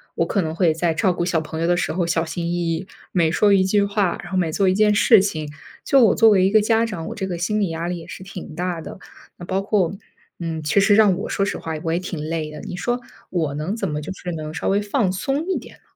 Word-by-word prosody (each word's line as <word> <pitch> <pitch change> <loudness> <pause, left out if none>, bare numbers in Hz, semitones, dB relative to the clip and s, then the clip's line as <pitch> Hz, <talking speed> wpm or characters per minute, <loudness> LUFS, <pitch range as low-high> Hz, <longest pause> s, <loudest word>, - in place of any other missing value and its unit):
我 - - +1
可 200 - 0
能 160 -2 -3
会 170 -2 +3
在 165 +1 0
照 185 +3 +2
顾 175 - -2
小 175 -2 +1
朋 160 +1 -5
友 165 - +1
的 175 0 +2
时 175 - -1
候 175 0 -1
小 165 0 +1
心 170 +1 -4
翼 - - -1 0.2
翼， 180 +4 -4 0.2
每 170 -3 +2
说 205 +5 +3
一 190 -1 +4
句 200 +2 +2
话， 200 -3 0
然 - - -10
后 190 - 0
每 165 -3 0
做 195 +4 +1
一 185 - +4
件 210 +1 +3
事 220 0 +6
情， 155 -7 -3 0.3
就 270 -2 +5
我 220 - +5
作 225 - +6
为 190 -3 +4
一 - - +2
个 215 +1 +5
家 225 +1 +2
长， 195 -8 -4
我 - - -5
这 190 -2 -3
个 175 -2 -3
心 210 +5 -1
理 200 -4 +1
压 165 +1 -3
力 180 - -2
也 165 - -11
是 185 - -9
挺 185 -4 -9
大 175 -1 -3
的， - - -9 0.4
那 175 - -9
包 190 +2 -1
括， 195 -3 0 0.4
嗯， 165 -2 -3
其 150 +6 +2
实 205 +1 +5
让 210 -3 +5
我 200 - -5
说 195 - 0
实 - - -3
话 160 - -5
我 165 - 0
也 170 - +1
挺 180 -3 -5
累 155 0 -3
的， 150 - -8
你 - - -6
说， 240 +6 -1 0.3
我 160 -6 -1
能 155 +7 -3
怎 230 - -2
么 150 0 -3
就 155 - -6
是 180 -1 -6
能 155 -1 -5
稍 - - -3
微 200 +1 +2
放 210 0 0
松 275 - -2
一 380 - 0
点 - - -10
呢？ - - -35
180 Hz, 310 characters per minute, -22 LUFS, 165-200 Hz, 0.4 s, 事